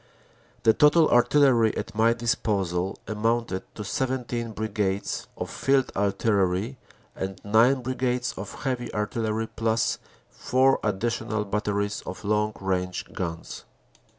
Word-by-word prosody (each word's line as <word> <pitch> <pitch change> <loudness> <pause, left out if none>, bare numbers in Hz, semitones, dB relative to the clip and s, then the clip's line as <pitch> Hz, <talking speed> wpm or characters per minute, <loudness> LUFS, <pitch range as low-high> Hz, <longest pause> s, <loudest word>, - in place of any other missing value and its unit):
The 110 - +6
total 150 +4 +5
Artillery 120 -2 +4
at - - -4
my 115 +2 +4
disposal 100 -6 -1
amounted 115 -2 0
to 105 - -5
17 120 0 -2
Brigades 105 -2 -2
of - - -4
Field 135 -1 +1
Artillery 100 +3 +1 0.4
and 95 0 -4
nine 120 +5 +4
Brigades 125 -1 -1
of 95 +1 -8
Heavy 125 -3 -2
Artillery, 110 +1 -1
plus 115 0 0 0.3
four 130 +1 +2
additional 110 +1 -1
batteries 100 0 -1
of - - -6
long 105 +1 +1
range 90 -1 -2
guns." 85 -3 -5
110 Hz, 115 wpm, -26 LUFS, 100-120 Hz, 0.4 s, The